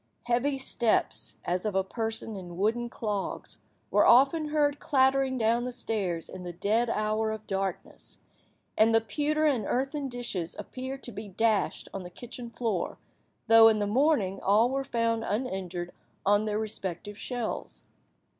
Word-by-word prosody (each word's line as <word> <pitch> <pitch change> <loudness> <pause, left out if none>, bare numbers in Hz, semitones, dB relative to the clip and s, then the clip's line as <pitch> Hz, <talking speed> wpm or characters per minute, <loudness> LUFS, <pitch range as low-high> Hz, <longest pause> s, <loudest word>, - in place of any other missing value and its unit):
Heavy 245 +4 +1
steps, 240 -3 +1
as 180 +1 0
of 210 -3 -2
a 190 - +3
person 225 +1 -2
in 175 -3 -8
wooden 230 +5 0
clogs, 210 -4 -4 0.3
were - - +5
often 280 +5 +5
heard 295 -1 +1
clattering 265 -1 +2
down 230 +1 +2
the 250 - -3
stairs 200 -8 -1
in 185 - -9
the 175 -1 -5
dead 215 +7 +1
hour 215 0 0
of 220 0 -5
darkness, 195 -2 -4 0.6
and 225 +1 +4
the - - +7
pewter 295 +8 0
and 265 -8 +2
earthen 275 +2 -1
dishes 235 -9 -3
appeared 260 +5 -6
to 240 - -5
be 210 0 -7
dashed 210 0 0
on 195 - -4
the 175 - -8
kitchen 240 +5 -7
floor, 225 -6 -2 0.5
though, 225 0 +8
in 220 -1 +4
the 205 - 0
morning, 210 -4 +2
all 220 +5 +4
were 275 0 -1
found 230 -3 0
uninjured 190 -6 -3 0.3
on 205 +1 +4
their 210 -1 -1
respective 205 -2 -4
shelves. 240 +1 -4
225 Hz, 155 wpm, -28 LUFS, 200-250 Hz, 0.6 s, though